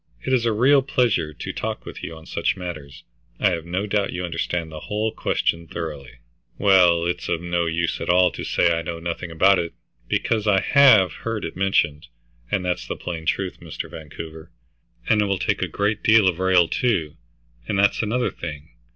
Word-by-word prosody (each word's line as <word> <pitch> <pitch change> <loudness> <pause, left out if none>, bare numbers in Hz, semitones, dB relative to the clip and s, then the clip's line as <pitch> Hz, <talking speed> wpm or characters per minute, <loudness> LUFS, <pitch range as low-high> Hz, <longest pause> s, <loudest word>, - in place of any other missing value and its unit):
It 130 - 0
is 120 -2 +2
a - - +2
real 130 +6 +4
pleasure 120 - +1
to 75 - -7
talk - - -4
with - - -9
you 80 - -6
on 80 - -14
such - - -1
matters. 75 -6 -8 0.4
I - - +3
have 85 -2 -3
no 95 +4 -2
doubt 100 -1 0
you 90 0 -3
understand 85 -1 -3
the 80 - -7
whole 105 +6 -2
question 85 -4 -1
thoroughly." 75 -7 -6 0.4
"Well, 90 -4 +5
it's 90 0 -2
of 85 - 0
no 85 0 -1
use 85 +1 -1
at - - -4
all 90 0 +5
to - - -7
say 85 -1 +2
I 85 - -2
know 85 +1 -5
nothing 85 +1 -4
about 95 +4 +4
it, 85 -1 -4 0.3
because 110 -2 0
I 100 -2 +4
have 110 - +6
heard 115 -4 -4
it 85 - -6
mentioned, 90 -6 0 0.4
and 90 - -1
that's 90 0 -2
the - - -3
plain 80 -2 -6
truth, 95 -2 -1
Mr. - - -7
Vancouver. 80 +1 -9 0.6
And 105 - +4
it - - +2
will 100 -1 0
take - - -1
a - - 0 0.3
deal 110 -1 +4
of 90 -1 0
rail, 95 -2 +4
too, 85 -12 0 0.5
and 100 - -1
that's 100 +1 +3
another 120 +3 0
thing. 75 0 -8
90 Hz, 195 wpm, -23 LUFS, 80-105 Hz, 0.6 s, have